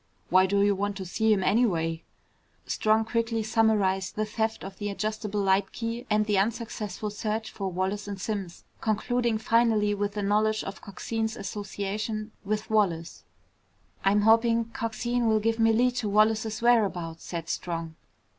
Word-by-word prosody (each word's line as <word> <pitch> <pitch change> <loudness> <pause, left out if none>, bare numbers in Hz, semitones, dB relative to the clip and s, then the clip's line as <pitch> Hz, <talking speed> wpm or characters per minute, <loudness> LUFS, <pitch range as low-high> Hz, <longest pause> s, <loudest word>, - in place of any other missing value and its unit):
Why 185 +1 +6
do 200 +1 +2
you 205 0 +4
want 200 0 -2
to 190 - -5
see 220 +5 +1
him, 195 -3 +3
anyway?" 170 -7 +1 0.6
Strong 220 +1 +2
quickly 230 0 -1
summarized 210 -4 +1
the 215 - 0
theft 220 +1 -2
of 195 0 -9
the 205 -1 -2
adjustable 210 +1 -2
light 195 0 +2
key 230 +1 -4
and 210 0 +3
the 205 -2 +2
unsuccessful 215 -1 -2
search 215 +1 -3
for 195 -2 -4
Wallace 190 +3 -2
and 200 -1 -5
Simms, 195 -3 -4 0.2
concluding 230 +1 0
finally 220 -2 +2
with 205 0 -2
the 205 - -3
knowledge 215 +2 +2
of 195 - -7
Coxine's 220 +3 -3
association 210 +2 -4
with 215 +1 -2
Wallace. 180 -7 0 0.8
"I'm 200 +2 +4
hoping 230 +1 +3
Coxine 235 +1 -1
will 220 -1 +3
give 225 +1 0
me 225 0 +5
a - - +4
lead 245 +2 +2
to 220 -4 -1
Wallace's 220 +1 +2
whereabouts," 190 -9 +2
said 165 -2 -5
Strong. 165 -2 -4
215 Hz, 160 wpm, -27 LUFS, 195-225 Hz, 0.8 s, Why